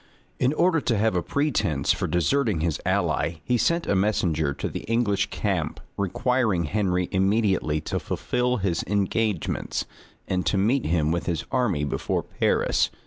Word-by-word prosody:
In 130 +1 +3
order 170 0 +2
to 115 -5 0
have 110 -1 +1
a 90 - +2
pretence 120 - 0
for - - -2
deserting 105 - +1
his 80 -2 -1
ally, 85 - +1
he 125 - +1
sent 170 +8 +1
a - - +1
messenger 85 -7 +1
to 70 - -4
the - - -4
English 110 -4 +1
camp, 90 -7 -2 0.2
requiring 105 -1 +1
Henry 90 +1 0
immediately 95 -5 +1
to - - -2
fulfil 125 0 -1
his 95 -5 -1
engagements, 100 -1 -1 0.4
and 90 -1 0
to 95 - +2
meet 115 - +2
him 80 -2 +1
with 85 - -2
his 85 -2 -1
army 115 - +1
before 70 - -1
Paris. - - +1
100 Hz, 155 wpm, -25 LUFS, 85-120 Hz, 0.4 s, In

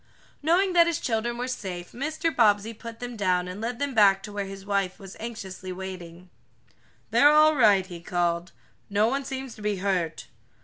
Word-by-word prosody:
Knowing 355 +5 +2
that 340 -1 +6
his 335 -3 0
children 235 0 -1
were 250 +1 -3
safe, 185 -8 -5
Mr. 310 +4 -2
Bobbsey 215 -2 +3
put 230 +1 -10
them 245 -1 -6
down 180 -4 +1
and 185 +3 -7
led 235 +1 -3
them 285 +1 -2
back 195 -3 +5
to 210 - -8
where 200 -1 -3
his 195 0 -9
wife 195 -2 -1
was 195 0 -11
anxiously 195 -5 -7
waiting. 180 -1 -8 0.8
"They're 290 - +6
all 305 +1 +6
right," 205 -7 +5
he 175 -2 -9
called. 175 0 -1 0.4
"No 205 +2 +3
one 270 +3 -1
seems 265 -2 -5
to - - -13
be 210 -1 0
hurt." 180 -4 -1
205 Hz, 185 wpm, -26 LUFS, 185-250 Hz, 0.8 s, that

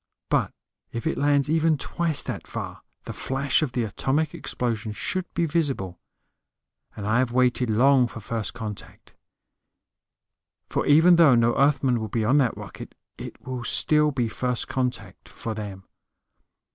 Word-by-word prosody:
But - - +2 0.4
if 115 - -5
it 160 - 0
lands 145 -1 +3
even 160 0 +2
twice 160 +2 0
that - - -5
far - - -6 0.2
the - - -6
flash 135 +2 0
of 150 -5 -2
the 120 -1 0
atomic 140 +8 -1
explosion 110 -3 -3
should 185 - -3
be 170 - +1
visible. 135 - -1 1.0
And 100 - -6
I 110 +3 +2
have 130 -2 +1
waited 125 -1 +2
long 125 +3 +4
for 115 - -9
first 115 0 -4
contact. 105 -4 -8 1.6
For - - -1
even 165 +4 +6
though 155 -7 +7
no 115 0 +3
Earthman 135 -3 +2
will 110 - -3
be 110 +1 -1
on 135 +7 +4
that 125 -5 +1
rocket, - - -9 0.2
it - - -8
will 130 -2 -5
still 150 +5 +3
be 125 -5 -1
first 125 +2 -2
contact 125 -7 -4
for 115 - -5
them. 100 -3 -7
125 Hz, 155 wpm, -25 LUFS, 115-145 Hz, 1.6 s, though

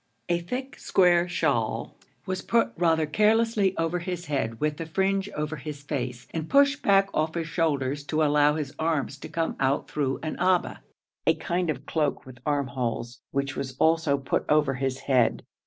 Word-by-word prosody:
A 175 0 +2
thick 255 +10 -5
square 175 -2 +3
shawl 135 -10 -1 0.3
was 185 0 -3
put 230 +3 +2
rather 165 -2 +2
carelessly 210 +3 +2
over 165 +2 0
his 175 0 -4
head 125 -6 -2
with 150 -1 0
the 165 - -5
fringe 195 +3 0
over 150 +1 -3
his 145 0 -7
face, 125 -4 -4
and 160 -1 -3
pushed 280 +1 +4
back 195 0 +4
off 155 +1 0
his 165 -2 -2
shoulders, 145 -4 0
to 155 +1 +1
allow 150 0 +4
his 150 -3 -4
arms 155 -3 -1
to - - -8
come 165 -1 -1
out 135 +1 +1
through 140 -3 -1
an 155 - -3
abba, 180 0 +1 0.5
a - - +5
kind 175 -1 -1
of 140 -2 -3
cloak 150 -3 -1
with 130 -1 -12
armholes, 125 -4 -2
which 140 0 -2
was 135 -1 -4
also 160 -3 +3
put 135 - -1
over 150 -2 +3
his 135 0 -2
head. 125 -4 +2
155 Hz, 175 wpm, -26 LUFS, 140-175 Hz, 0.5 s, a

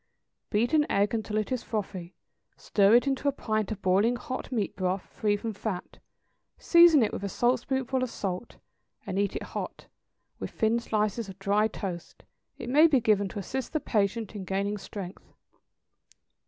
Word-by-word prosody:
= - - -55
Beat 235 +6 +1
an 300 -1 +4
egg 200 +2 +2
until 215 -1 -2
it 215 +2 -1
is 255 -2 0
frothy, 190 -6 -5 0.4
stir 205 +2 +4
into 270 +3 +2
it - - +6
a - - +1
pint 215 -6 -2
of 215 - -5
boiling 200 +6 +3
hot 255 +1 -6
meat 220 -6 -1
broth, 185 0 -1
free 205 -1 -1
from 220 +2 -4
fat, 200 -2 -5 0.6
season 340 -6 +6
it 215 - -1
with - - -4
a 200 - -2
saltspoonful 255 +3 0
of 255 - -1
salt, 195 +1 -5 0.5
and 190 - -2
eat 200 -1 0
it - - -3
hot, - - -6 0.5
with - - -4
thin 225 +1 +1
slices 215 -1 -1
of 190 - -10
dry 205 +2 +2
toast; 185 -5 -7 0.3
it - - -7
may 295 +6 +6
be 285 -5 +4
given 210 -3 +2
to 200 - -8
assist 255 - -4
the 310 - +1
patient 220 -3 -1
in 200 - -5
gaining 200 +2 -2
strength. 195 -2 -9
215 Hz, 180 wpm, -28 LUFS, 200-245 Hz, 0.6 s, it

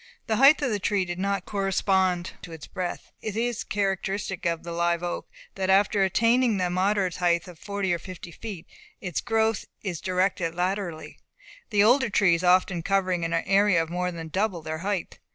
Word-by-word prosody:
The 220 - 0
height 280 +3 +6
of 255 - +1
the 210 - 0
tree 195 0 0
did 175 0 -5
not 195 -1 -1
correspond 190 -2 +1
to 170 - -10
its 160 -2 -9
breadth. 185 -2 -5
It 215 -2 -4
is 235 0 -1
characteristic 195 -2 -2
of 170 -1 -2
the 170 - -6
live 170 0 0
oak 175 - -4 0.2
that, 190 -1 -2
after 195 +1 +4
attaining 230 +4 +3
the 180 -1 0
moderate 190 0 +1
height 175 -1 +1
of 175 -3 -12
forty 200 -3 -2
or 170 - -1
fifty 180 -2 -9
feet, 190 -2 -8 0.3
its 180 -5 -3
growth 225 -1 +1 0.2
is 180 -6 -4
directed 185 -2 0
laterally; 180 -3 -3 0.5
the 205 -1 +4
older 250 +3 +4
trees 180 -4 +3
often 180 -1 +3
covering 185 -1 0
an 165 0 -1
area 195 +1 +3
of 165 0 -2
more 180 +1 -1
than 165 -2 -7
double 190 -1 -1
their 155 0 -4
height. 195 0 -3
185 Hz, 185 wpm, -26 LUFS, 175-205 Hz, 0.5 s, height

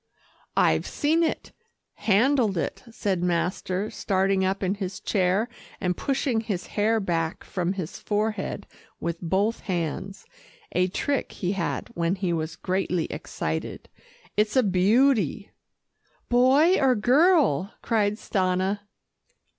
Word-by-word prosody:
"I've - - +3
seen 315 +3 +1
it, 325 - -1 0.4
handled 225 -1 +2
it," - - -2
said 200 -5 -1
master 180 +3 -1
starting 190 -1 +1
up 190 +1 0
in 190 +1 +1
his 190 -2 -5
chair 195 +3 +1 0.3
and 180 -2 0
pushing 265 -2 0
his 200 -5 -3
hair 220 +2 +2
back 165 -4 -2
from 180 0 -2
his 185 -5 -5
forehead 210 -1 -2 0.3
with 170 0 -3
both 195 +6 0
hands 185 +2 -4 0.5
a 180 - +2
trick 275 +8 -2
he 180 -1 -2
had 195 -4 -2
when 170 +2 0
he 185 -3 -1
was 160 0 -3
greatly 180 -2 -1
excited. 80 +1 -4 0.5
"It's 210 +2 +1
a 260 - +5
beauty." 205 - +2 0.8
"Boy 270 +9 +5
or 265 -2 +4
girl?" 250 - +3
cried 210 -3 +2
Stanna. 190 -1 0
195 Hz, 125 wpm, -25 LUFS, 180-225 Hz, 0.8 s, a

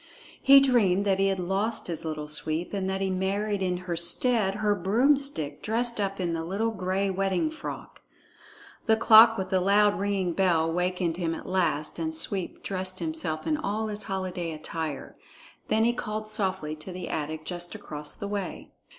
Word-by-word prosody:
He 275 +1 +8
dreamed 210 -8 +3
that 195 -1 +2
he 195 - +3
had 195 -1 0
lost 195 +5 -1
his 165 -1 -4
Little 155 -2 -4
Sweep, 155 +4 -2
and 190 -1 -1
that 190 0 -2
he 190 -1 0
married 200 +2 -1
in 180 -1 0
her 175 -2 -2
stead 195 +4 +1
her 210 0 +1
broomstick 215 - +1
dressed 235 +1 -1
up 195 0 -2
in 175 -2 -1
the 165 0 -2
little 200 +7 -1
gray 190 -1 -1
wedding 195 - 0
frock. 315 - -8 0.9
The 220 - +5
clock 225 0 +8
with 190 0 -4
the 190 - +3
loud 205 +2 +4
ringing 195 -3 0
bell 165 -3 +2
wakened 180 -1 -1
him 165 -2 -1
at - - -9
last, 170 -5 -1
and 160 -1 -2
Sweep 185 +3 -2
dressed 185 -1 -2
himself 160 -1 -2
in 305 - +1
all 220 -6 -2
his 210 0 -5
holiday 185 -4 -3
attire. 155 -2 -5 0.5
Then 220 +1 +2
he 240 - +3
called 215 -2 -4
softly 190 -7 -2
to 155 +5 -8
the 180 -1 -6
attic 155 +1 -4
just 175 +2 -5
across 150 -8 -6
the 200 - -5
way. 200 -1 -5
190 Hz, 180 wpm, -27 LUFS, 170-210 Hz, 0.9 s, He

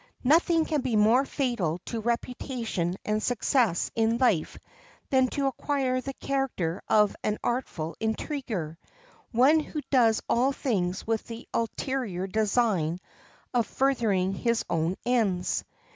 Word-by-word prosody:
Nothing 325 +4 +4
can 305 -3 0
be 255 -3 -1
more 225 +6 +4
fatal 240 - -1
to 230 - -4
reputation 235 -5 -2
and 215 0 0
success 235 -5 +1
in 225 +1 +2
life 235 -11 +1 0.5
than 260 -1 +4
to 280 +2 -2
acquire 270 -1 0
the 270 +1 -6
character 255 -12 -2
of 210 -1 +4
an 210 0 0
artful 180 -10 -2
intriguer, 220 - -3 0.5
one 265 +7 +5
who 305 0 -4
does 230 -5 +4
all 260 +4 +2
things 190 -9 -1
with 225 -1 -1
the 230 0 -8
ulterior 230 -5 -2
design 200 -5 +1 0.6
of 235 -4 +2
furthering 220 -9 +1
his 235 +4 0
own 165 +2 +1
ends. 200 -8 +1
230 Hz, 130 wpm, -27 LUFS, 195-260 Hz, 0.6 s, one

